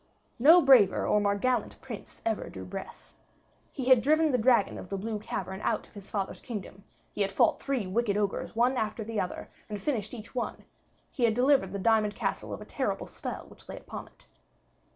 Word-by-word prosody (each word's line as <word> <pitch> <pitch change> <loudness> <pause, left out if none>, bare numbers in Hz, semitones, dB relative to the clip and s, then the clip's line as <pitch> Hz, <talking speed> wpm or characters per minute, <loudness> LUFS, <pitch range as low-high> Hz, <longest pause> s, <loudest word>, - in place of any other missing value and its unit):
No 320 +7 +8
braver 250 -8 +6
or 210 - +3
more 200 0 +2
gallant 245 +1 -1
prince 235 -6 -10
ever 225 -2 -1
drew 95 -1 -8
breath. 90 - -9 0.6
He 260 - -5
had 255 -2 +6
driven 310 +3 +3
the 250 - +2
dragon 235 -2 +3
of 180 - -10
the 195 - -2
blue 215 +2 -3
cavern 190 -1 -5
out - - -1
of - - -25
his 200 -1 -11
father's 195 -2 -3
kingdom; 200 -4 -7 0.3
he - - -3
had 195 -1 +1
fought 195 - +3
three 270 -7 -1
wicked 205 +2 0
ogres 205 0 -2
one 245 +3 +3
after 220 0 -2
the 220 0 -3
other, 180 - -3 0.2
and 210 -1 -4
finished 220 -2 -2
each 225 -1 -10
one; 250 - -4 0.5
he 245 - +1
had 220 -2 +2
delivered 255 -6 +3
the 200 - -3
diamond 215 +1 +2
castle - - -3
of - - -5
a - - -8
terrible - - -2
spell - - -6
which - - -17
lay - - -6
upon - - -8
it. - - -22
220 Hz, 205 wpm, -29 LUFS, 200-250 Hz, 0.6 s, No